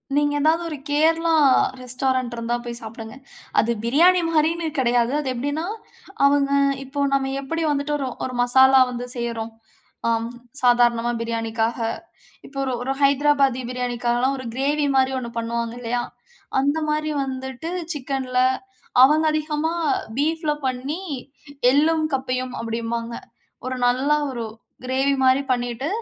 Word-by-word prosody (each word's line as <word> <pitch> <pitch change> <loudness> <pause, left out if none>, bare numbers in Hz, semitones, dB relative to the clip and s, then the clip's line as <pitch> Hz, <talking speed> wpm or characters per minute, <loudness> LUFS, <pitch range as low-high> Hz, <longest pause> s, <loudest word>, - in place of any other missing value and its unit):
நீங்க 290 0 +2
ஏதாவது 320 +3 +3
ஒரு 305 -3 -5
கேரளா 325 +3 +3 0.5
ரெஸ்டாரண்ட் 255 0 -1
இருந்தா 230 +1 -2
போய் 235 0 -5
சாப்டுங்க. 220 +1 -8 0.4
அது 235 - +2
பிரியாணி 345 +9 +4
மாரின்னு 330 +1 +1
கிடையாது. 240 -1 +2
அது 295 - -4
எப்டினா, 285 +6 -2 0.6
அவங்க 280 0 +3 0.3
இப்போ 280 +2 -4
நம்ம 270 -1 +1
எப்படி 330 +4 -3
வந்துட்டு 285 +1 -1
ஒரு, 275 -2 -3 0.2
ஒரு 255 - -5
மசாலா 260 +2 +6
வந்து 245 0 -5
செய்யறோம். 230 -1 -3 0.6
அம். 230 0 0 0.3
சாதாரணமா 240 -1 +3
பிரியாணிக்காக. 225 0 -1 0.7
இப்போ 275 - -12
ஒரு 260 - -1
ஒரு 270 +2 -1
ஹைதராபாத்தி 275 -2 +3
பிரியாணிக்காக 245 -1 -1
எல்லாம், 265 +2 +1
ஒரு 260 - -7
கிரேவி 285 +2 +1
மாரி 265 0 +3
ஒண்ணு 235 -2 -6
பண்ணுவாங்க, 230 0 -2
இல்லையா! 240 0 -2 0.6
அந்த 285 +3 +1
மாரி 305 0 0
வந்துட்டு 265 +3 -5 0.2
சிக்கன்ல. 260 -2 -2 0.6
அவங்க 305 +4 +5
அதிகமா 310 +1 -1 0.4
பீஃப்ல 310 +1 +1
பண்ணி 265 +7 -3 0.7
எள்ளும், 315 +3 +3
கப்பையும் 255 -1 -3
அப்டின்பாங்க. 230 0 -3 0.5
ஒரு 255 - -2
நல்ல 260 +4 +1 0.2
ஒரு 235 -3 -4 0.4
கிரேவி 270 +2 +1
மாரி 260 +1 +4
பண்ணிட்டு 245 +2 -1
260 Hz, 130 wpm, -22 LUFS, 240-290 Hz, 0.7 s, மசாலா